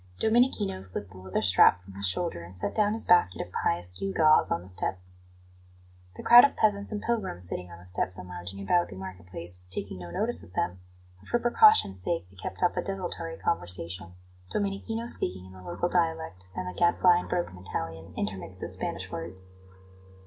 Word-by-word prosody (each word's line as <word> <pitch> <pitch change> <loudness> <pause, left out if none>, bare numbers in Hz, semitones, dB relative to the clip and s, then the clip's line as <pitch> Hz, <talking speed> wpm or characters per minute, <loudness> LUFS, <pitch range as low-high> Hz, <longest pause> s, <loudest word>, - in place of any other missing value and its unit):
Domenichino 220 - +2
slipped 95 +1 -5
the 95 - -12
leather 95 +3 -2
strap 95 -1 +5
from 95 +1 -13
his 100 +1 -1
shoulder, 165 - -1
and 85 +2 -9
set - - -2
down 210 -1 +2
his 225 - +2
basket 175 - +4
of - - -6
pious 85 +1 -1
gewgaws 155 - +3
on 85 - -1
the - - -13
step. 95 0 -3 1.2
The - - -9
crowd 240 +1 +10
of 285 - +3
peasants 205 -1 +1
and 210 -1 -4
pilgrims 195 - -1
sitting 90 0 -5
on 85 - -11
the 85 - -15
steps 90 0 -1
and 90 - -8
lounging 90 +2 -8
about 175 - +2
the - - -10
market 95 -1 -9
place 90 0 -5
was 90 0 -4
taking 90 0 -1
no 90 -1 -8
notice 225 - +1
of 90 - -15
them, 90 0 -2 0.4
but - - -17
for 240 - +3
precaution's 240 - +5
sake 165 - -2
they - - -19
kept 95 - -6
up 180 - +3
a - - +2
desultory 175 -4 -4
conversation, 90 - -4 0.4
Domenichino 210 +3 -2
speaking 95 - +2
in 95 - -13
the 95 - -12
local 90 - -2
dialect 160 - -1
and 90 - -4
the 90 - -5
Gadfly 175 - +4
in - - -7
broken 175 - -2
Italian, 80 -2 -6
intermixed 95 -1 -4
with - - -5
Spanish - - -4
words. 90 +3 -7
95 Hz, 200 wpm, -28 LUFS, -, 1.2 s, crowd